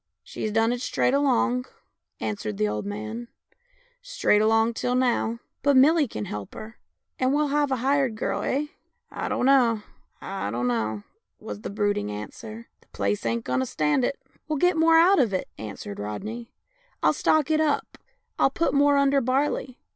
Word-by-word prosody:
" - - -60
" - - -60
She's 215 - -3
done 225 +2 +2
it 245 - -4
straight 250 - +1
along," 255 -3 +2 0.5
answered 210 -1 -4
the 215 0 +1
old 200 - -3
man, 215 +3 -5 0.4
" - - -37 0.2
straight 210 - +4
along 225 +1 +3
till 245 +2 -1
now." 240 -2 +1
" - - -55
But 280 -1 +4
Millie 300 +2 +5
can 105 - -5
help 105 -1 -7
her, 225 +1 -10 0.4
and 255 0 +2
we'll 300 0 +1
have 290 0 +1
a 265 - +1
hired 270 -4 +2
girl, 215 - -2
eh? 285 +3 0 0.2
" - - -49
" - - -45
I - - -4
dunno, 245 -5 +3 0.4
I 195 - -4
dunno," 115 -2 -1 0.4
was 105 0 -7
the - - -5
brooding 205 - -1
answer; 215 - -8
" - - -49
the - - -27
place 100 +3 -2
ain't 115 0 -1
going 125 0 0
to 130 - 0
stand 150 - +1
it." 275 - -1
" - - -51
Oh, - - -37 0.2
we'll 305 -1 -1
get 355 +5 +3
more 325 0 +5
out 365 +4 +6
of 220 -7 +2
it," 185 - -2
answered 105 -1 -7
Rodney. 215 - -6 0.3
" - - -33
I'll - - +4
stock 315 -1 +2
it 310 0 +3
up, 300 -2 -1 0.4
I'll - - +5
put 335 +5 0
more 285 0 +4
under 280 0 +3
barley. 260 0 -1
235 Hz, 200 wpm, -25 LUFS, 200-280 Hz, 0.5 s, out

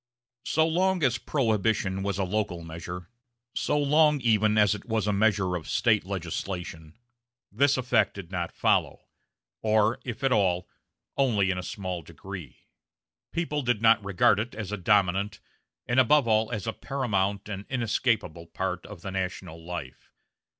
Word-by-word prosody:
So 160 +1 +3
long 180 +1 +1
as 125 -3 +2
Prohibition 110 -8 0
was 100 -1 -2
a 100 - 0
local 95 -3 -2
measure, 85 +2 -8 0.4
so 150 - 0
long 150 +1 +4
even 110 -2 +3
as 105 -1 +5
it 100 - -7
was 110 -3 -1
a 105 - +1
measure 100 -3 +2
of 85 -3 -6
State 110 -5 +2
legislation, 85 -2 -5 0.5
this 135 +7 +3
effect 125 -1 +2
did 95 -3 -9
not 85 -2 -3
follow; - - +1 0.6
or, 110 +1 +2
if 125 +2 -6
at 135 - +2
all, 90 -5 +2 0.5
only 105 -8 +2
in 90 - -2
a - - -3
small 90 0 -5
degree. 85 -1 -10 0.7
People 155 -3 -1
did 120 -4 0
not 110 -1 +5
regard 100 +1 +3
it 115 +3 -4
as 105 -3 -5
a - - -1
dominant, 100 +1 +1 0.5
and 120 +2 +2
above 135 +1 +4
all 110 0 +2
as 110 -3 -3
a 110 - -2
paramount 100 -8 -1
and 100 -1 -6
inescapable, 115 - -1
part 90 +1 -3
of 105 -5 -10
the 95 - -4
national 90 -3 -4
life. 80 -7 -7
105 Hz, 155 wpm, -27 LUFS, 90-115 Hz, 0.7 s, as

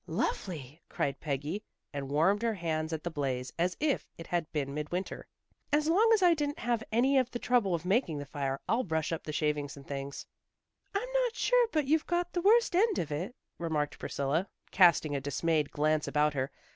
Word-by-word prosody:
"Lovely!" 160 - -3
cried 140 - -2
Peggy, 150 +7 -3 0.3
and 140 -1 -4
warmed 165 +9 +3
her 230 -2 0
hands 160 -3 -2
at 160 -1 -3
the 175 - -3
blaze 130 -4 -2
as 180 +1 +1
if 295 -2 0
it 165 - -8
had 170 -2 -2
been 140 -3 -2
midwinter. 150 +6 -4 0.4
"As 300 +1 +2
long 405 +8 +4
as 405 - 0
I 350 -1 +7
didn't 290 -2 -2
have 235 -2 -1
any 260 +5 +4
of 255 -1 0
the 245 - -4
trouble 240 -7 +2
of 170 - -5
making 190 - +1
the 145 - -5
fire, 140 -1 -3
I'll 230 +3 +2
brush 160 -5 -1
up 165 - -3
the 155 - -4
shavings 150 -1 -1
and 140 - -12
things." 140 0 -5 0.7
"I'm 430 +5 0 0.2
not 475 -2 -2
sure - - +3
but 305 -3 +1
you've 310 +3 +2
got 350 0 -1
the 350 - 0
worst 445 +1 +4
end 420 +2 +3
of 155 - -2
it," 175 - -3 0.2
remarked 155 -3 -1
Priscilla, 150 +7 -1 0.2
casting 170 -5 +5
a 140 - -1
dismayed 150 +2 0
glance 155 +1 +1
about 150 0 +2
her. 135 -1 -1
165 Hz, 200 wpm, -31 LUFS, -, 0.7 s, I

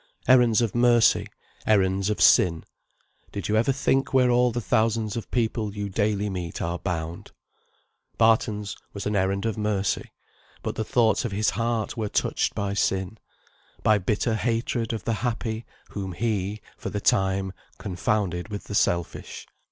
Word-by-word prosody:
Errands 120 -3 +5
of 115 - -1
mercy 120 -1 +4 0.4
errands 95 -2 +2
of 105 - -1
sin 85 -3 +5 0.7
did 100 -4 -4
you 105 - +1
ever 115 +5 +3
think 135 0 +1
where 125 -1 +5
all 125 0 +3
the 120 - -2
thousands 110 +1 +1
of 115 - -5
people 110 -3 -1
you 100 -1 -3
daily 105 0 0
meet 90 -4 -4
are 85 +1 -2
bound? 85 -1 -4 0.9
Barton's 105 -3 +2 0.2
was 100 - -6
an 105 - -1
errand 100 +1 0
of 110 -1 -2
mercy; 105 -2 -1 0.5
but - - -2
the 110 - -2
thoughts 110 0 +2
of 120 - -3
his 105 +2 +1
heart 115 -2 -2
were 110 -2 -2
touched - - 0
by 100 -1 -2
sin, 95 +1 -1 0.6
by 105 -1 +4
bitter 105 +4 0
hatred 115 +1 -1
of 110 -4 -4
the 115 - 0
happy, 115 -1 -3 0.2
whom 95 -2 -5
he, 105 0 -2 0.2
for - - -5
the 105 - -3
time, 95 -1 +1 0.2
confounded 95 -2 -1
with 105 -1 -5
the - - -8
selfish. 85 -3 -1
105 Hz, 160 wpm, -25 LUFS, 95-115 Hz, 0.9 s, Errands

